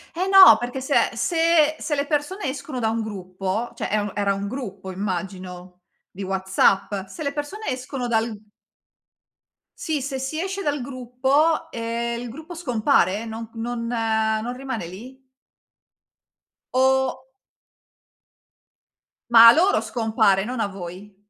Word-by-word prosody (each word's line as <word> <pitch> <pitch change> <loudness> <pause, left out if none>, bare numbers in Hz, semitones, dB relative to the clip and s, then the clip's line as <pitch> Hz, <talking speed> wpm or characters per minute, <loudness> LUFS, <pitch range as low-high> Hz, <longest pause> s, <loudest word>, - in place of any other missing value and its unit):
Eh 365 +3 -1
no, 385 -1 +9
perché 245 +2 -5
se 275 +2 -1 0.2
se 325 +4 +2
se 295 - -2
le 280 0 -1
persone 315 +7 -2
escono 270 -1 -5
da 225 -2 +1
un 225 +1 -1
gruppo, 195 +2 -4
cioè - - -4
e 215 - +2
u 205 -1 -3
era 200 -1 +1
gruppo 200 -3 -6
immagino, 185 -1 -6 0.3
di 195 - -8
WhatsApp, 190 +1 +1
se 255 - -10
le 280 - -1
persone 295 +10 -6
escono 255 -1 -3
dal 225 -1 0 1.5
Sì, 310 -3 -1
se 265 0 -4
si 265 +4 -4
esce 385 +1 -4
dal 295 -5 -1
gruppo, 270 +6 0
ehm, 235 0 -3
il 245 - -6
gruppo 315 +8 -9
scompare? 245 - +1
Non 225 0 -7
non 230 0 -4
non 220 0 0
rimane 260 -9 -5
lì? 245 +9 -11 1.5
O 265 0 +2 2.1
Ma 230 -1 +10
a - - +11
loro 370 +7 +3
scompare, 220 -4 +1
non 245 +3 -4
a 215 - +1
voi. 190 +1 -9
235 Hz, 135 wpm, -23 LUFS, 205-280 Hz, 2.1 s, a